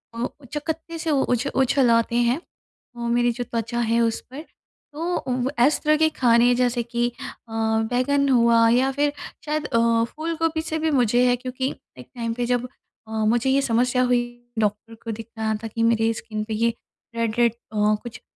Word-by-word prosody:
ओ 230 - -3 0.2
अ, - - -14
चकत्ते 320 +2 -4
से 320 0 -1
उ 280 -2 +2
उछ 245 +3 -1
उछलाते 240 -3 +3
हैं, 255 +6 0 0.6
वो 235 0 -4
मेरी 240 +1 +2
जो 245 +1 -4
त्वचा 235 0 -3
है 230 0 +1
उस 230 -1 +1
पर। 275 +3 -7 0.5
तो 300 - -7 0.3
वो 255 +1 -1
ऐसे 290 +4 +3
तरह 305 0 +4
के 315 +1 +3
खाने 240 0 +4
जैसे 245 -1 +1
कि 240 +1 -1
अ, 230 - -10
बैंगन 225 +5 +1
हुआ 235 -2 +5
या 255 +3 +3
फिर 290 +1 0 0.3
शायद 300 0 -2
अ, 230 -1 +2
फूलगोभी 325 +3 -2
से 315 - -1
भी 320 0 0
मुझे 245 -2 +3
है 245 - +4
क्योंकि 255 +1 -3 0.3
एक 125 - -11
टाइम 230 -1 -2
पे 240 +1 -2
जब 245 0 0 0.4
अ, - - -12
मुझे 235 +4 +2
ये 275 +1 +3
समस्या 250 0 +1
हुई 245 -1 +3 0.4
डॉक्टर 210 +2 -2
को 230 - -4
दिखाया 220 0 -4
था - - -3
कि 230 +1 -2
मेरे 225 -1 +3
स्किन 215 -1 -5
पे 220 +1 -5
ये 230 +2 +1 0.4
रेड-रेड 230 0 +1
अ, 215 -2 0
कुछ 240 -2 -9
240 Hz, 185 wpm, -23 LUFS, 230-265 Hz, 0.6 s, हुआ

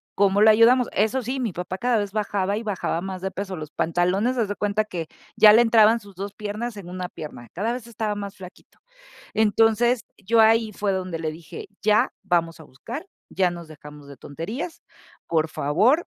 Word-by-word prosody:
cómo 200 +1 +3
lo 220 - +7
ayudamos”. 235 +3 +5
Eso 220 +6 +1
sí, 255 +3 -3
mi 235 -5 -1
papá 180 +2 -5
cada 240 +2 +1
vez 205 -1 -2
bajaba 205 -1 -1
y 225 - -4
bajaba 195 -5 -2
más 190 -1 -6
de 190 - -3
peso. 195 -1 -5
Los 155 -1 -8
pantalones, 185 +9 0
haz 225 - +1
de 205 - -3
cuenta 205 +1 0
que 170 -6 -5 0.3
ya 210 -1 +8
le 230 - +7
entraban 225 -1 +5
sus 200 -3 -16
2 200 +2 -6
piernas 215 +3 -5
en 185 -3 -9
una 180 0 -5
pierna, 150 -8 -9
cada 215 +7 -1
vez 245 -2 -7
estaba 215 -2 -3
más 200 0 -6
flaquito. 185 -1 -14 0.5
Entonces, 225 +2 +3 0.2
yo 225 +4 +1
ahí 225 0 +4
fue 205 0 -1
donde 185 -3 -3
le 155 -1 -2
dije: 160 +1 -10
“Ya, 215 0 +3
vamos 170 -3 0
a - - -11
buscar, 230 - -8 0.2
ya 185 -2 +1
nos 170 -1 -9
dejamos 150 -1 -13
de 140 -1 -12
tonterías, 215 - -6 0.5
por 160 -1 +1
favor”. 210 - +2
205 Hz, 195 wpm, -24 LUFS, 175-225 Hz, 0.5 s, ya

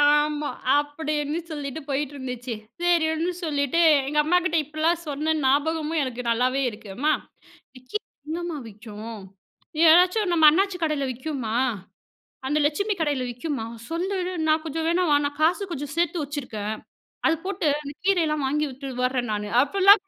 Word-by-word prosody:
ஆமா 295 0 +3 0.2
அப்டின்னு 295 +1 -1
சொல்லிட்டு 290 -1 -4
போயிட்டிருந்துச்சு 260 -4 -3 0.3
சரின்னு 335 0 +2
சொல்லிட்டு, 290 0 +1 0.3
எங்க 300 +1 -1
அம்மாகிட்ட 345 +1 +2
இப்படிலாம் 315 +3 0
சொன்னேன் 305 +2 0
ஞாபகமும் 310 +3 +1
எனக்கு 250 -2 -3
நல்லாவே 255 +4 +1
இருக்கு. 210 -1 -12
அம்மா, 300 +6 +2 0.6
விக்கி 255 +11 -4 0.3
எங்கம்மா 340 0 -3
விக்கும்? 215 +1 -9 0.7
ஏதாச்சும் 360 +4 +5
நம்ம 325 -2 +4
அண்ணாச்சி 385 +4 +1
கடையில 305 -4 0
விக்கும்மா? 255 -3 -4 0.9
அந்த 295 +3 +1
லட்சுமி 400 +8 0
கடையில 290 -5 0
விக்கும்மா? 245 -1 -4 0.2
சொல்லிடு 365 +2 -2 0.2
நான் 310 0 +3
கொஞ்சம் 320 +1 -3
வேணா 350 +2 +2
வா 290 - +6
நான் 290 0 -5
காசு 345 +6 +3
கொஞ்சம் 290 -1 -5
சேர்த்து 340 -1 +1
வைச்சுருக்கேன், 250 -8 -4 0.5
அது 320 - +4
போட்டு 380 -4 -1
அந்த 285 -1 -7
கீரையெல்லாம் 320 -7 +2
வாங்கி 300 +2 0
விட்டு 270 +1 -8 0.2
வர்றேன் 250 -2 0
நானு 210 0 -2
அப்டிலாம் 395 +6 +6
300 Hz, 135 wpm, -25 LUFS, 270-330 Hz, 0.9 s, வா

